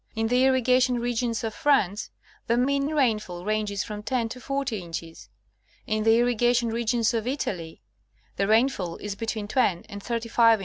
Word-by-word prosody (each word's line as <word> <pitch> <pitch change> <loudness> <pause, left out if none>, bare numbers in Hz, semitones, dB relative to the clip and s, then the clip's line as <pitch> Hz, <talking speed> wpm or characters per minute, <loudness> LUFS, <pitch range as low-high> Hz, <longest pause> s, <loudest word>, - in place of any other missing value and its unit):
In 225 0 0
the 250 +2 +4
irriga 255 -1 +3
tion 250 -1 +2
regions 235 -1 -1
of 220 -1 -2
France, 210 -10 +1 0.4
the 235 - +2
mean 275 +3 +1
rainfall 215 - 0
ranges 210 -2 -1
from 210 -1 -6
10 235 0 -1
to 250 +2 -8
40 275 -5 -2
inches; 165 -1 -8 0.6
in 215 0 -1
the 225 +1 +5
irrigation 240 0 +2
regions 230 +1 +1
of 230 0 -1
Italy, 180 - -4 0.5
the 195 - 0
rainfall 220 -6 +2
is 205 -1 -5
between 220 0 -4
280 210 -5 0
National 230 +4 -3
Oeogra^hic 230 0 -10
Magazine. 230 -2 +6
230 Hz, 170 wpm, -26 LUFS, 210-250 Hz, 0.6 s, Magazine